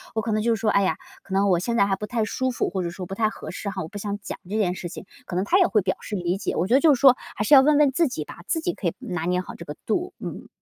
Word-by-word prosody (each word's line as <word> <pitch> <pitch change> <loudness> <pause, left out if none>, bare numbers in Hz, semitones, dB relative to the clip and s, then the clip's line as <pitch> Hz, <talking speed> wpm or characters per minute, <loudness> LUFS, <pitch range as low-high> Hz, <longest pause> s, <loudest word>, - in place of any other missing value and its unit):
我 220 - +1
可 220 - -3
能 215 - +1
就 235 - +3
是 - - -7
说， 220 -1 +1
哎 200 - +3
呀， 190 - +1 0.2
可 190 - -9
能 195 +1 +3
我 180 - +4
现 235 +5 -1
在 200 - +5
还 195 -1 +1
不 210 - -5
太 230 -2 0
舒 260 +4 -1
服， 245 - -1
或 185 0 -2
者 170 - -2
说 180 +1 -7
不 190 - -7
太 215 +1 +2
合 - - -9
适 200 - -5
哈， 190 -1 -4
我 - - -6
不 205 - -9
想 205 0 -3
讲 - - -6
这 215 - -1
件 180 -4 +1
事 175 - -6
情， 180 - -9 0.2
可 180 - -6
能 190 - 0
他 365 - +3
也 370 - +6
会 215 -4 +2
表 185 0 -1
示 210 - -5
理 180 0 -1
解。 - - -3
我 175 - +1
觉 235 - +1
得 270 - +7
就 310 -3 +6
是 - - -7
说 265 -3 +7 0.2
还 210 - -1
是 - - +3
要 265 - +9
问 295 +1 +4
问 290 -2 +5
自 320 +4 +2
己 155 -11 -4
吧， - - -11
自 325 - 0
己 355 +1 -1
可 185 - -3
以 - - 0
拿 175 -2 -4
捏 180 +1 +1
好 - - -9
这 - - -9
个 150 - -7
度， 355 - -1
嗯。 - - -7
205 Hz, 385 characters per minute, -24 LUFS, 185-245 Hz, 0.2 s, 要